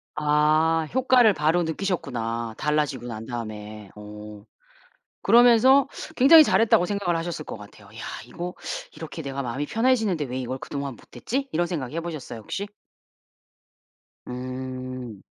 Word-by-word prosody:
아 155 +2 +2
효과를 255 -4 +5
바로 160 +3 +2
느끼셨구나, 120 - -3
달라지고 150 -4 -1
난 110 -1 -6
다음에. 110 -3 -7
오 105 0 -10 0.8
그러면서 245 +3 +6 0.3
굉장히 310 +5 +9
잘했다고 220 -9 +4
생각을 200 -4 -1
하셨을 165 -2 -4
것 - - -7
같아요. 105 0 -14
'이야 115 - -9 0.2
이거 180 +1 -6 0.4
이렇게 160 - -7
내가 140 0 -4
마음이 135 +4 -3
편해지는데 225 - +1
왜 130 0 -4
이걸 130 +1 -4
그동안 140 -3 -5
못했지?' 275 +3 -4
이런 175 +2 +1
생각 145 -7 -4
해 165 - -2
보셨어요, 155 -9 -7
혹시? 195 - -5 1.6
음. 130 -3 -6
150 Hz, 310 characters per minute, -25 LUFS, 120-180 Hz, 1.6 s, 굉장히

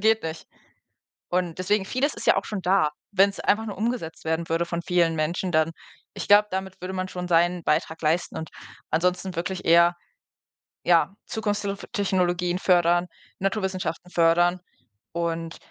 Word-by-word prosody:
geht 220 +1 +3
nicht.“ 160 0 -6 0.8
Und 175 -2 -1
deswegen 195 +1 +1
vieles 275 +7 0
ist - - -7
ja - - +6
auch - - 0
schon 210 -3 -4
da. 185 -4 +3 0.2
Wenn's 195 +1 +3
einfach 220 +2 +1
nur 205 - -6
umgesetzt 220 -9 -3
werden 160 +1 -1
würde 165 +1 +1
von 170 0 -3
vielen 170 -2 +2
Menschen, 170 +4 -1
dann 160 +1 +3 0.4
ich - - -6
glaube, 205 +1 +6
damit 190 -1 -4
würde 185 +1 -5
man 185 0 -2
schon 180 -1 -5
seinen 175 0 +3
Beitrag 160 +1 0
leisten 160 +3 0
und 160 - -5 0.4
ansonsten 180 +2 0
wirklich 185 +2 -3
eher, 170 +1 +6 0.9
ja, 175 +2 +3
Zukunftstelf 205 -2 -3
Technologien 180 -4 0
fördern, 175 -1 +3 0.3
Naturwissenschaften 190 -3 -2
fördern 175 +2 +3 0.5
und 165 -1 -3
180 Hz, 155 wpm, -25 LUFS, 165-195 Hz, 0.9 s, ja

